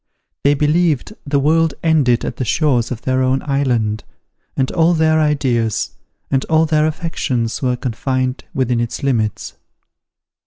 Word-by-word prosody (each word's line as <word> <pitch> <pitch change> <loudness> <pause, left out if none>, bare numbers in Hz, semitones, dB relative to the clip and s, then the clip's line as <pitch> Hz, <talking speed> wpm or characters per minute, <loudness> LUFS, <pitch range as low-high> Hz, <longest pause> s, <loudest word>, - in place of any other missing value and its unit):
They 145 +1 +4
believed 155 +3 +1
the 140 0 +1
world 160 +3 +2
ended 145 -8 +2
at - - -5
the - - -2
shores 125 -3 +1
of 125 -2 -6
their 130 0 +1
own 130 +1 +1
island, 125 -7 0 0.5
and 130 -1 0
all 170 +1 +3
their 160 0 +3
ideas 125 -8 0 0.4
and 135 -1 +1
all 160 0 +3
their 155 -1 +2
affections 145 -7 -2
were 125 -2 +1
confined 130 +2 -2
within 125 -2 0
its 120 +4 -3
limits. 115 -6 -1
135 Hz, 145 wpm, -18 LUFS, 125-155 Hz, 0.5 s, They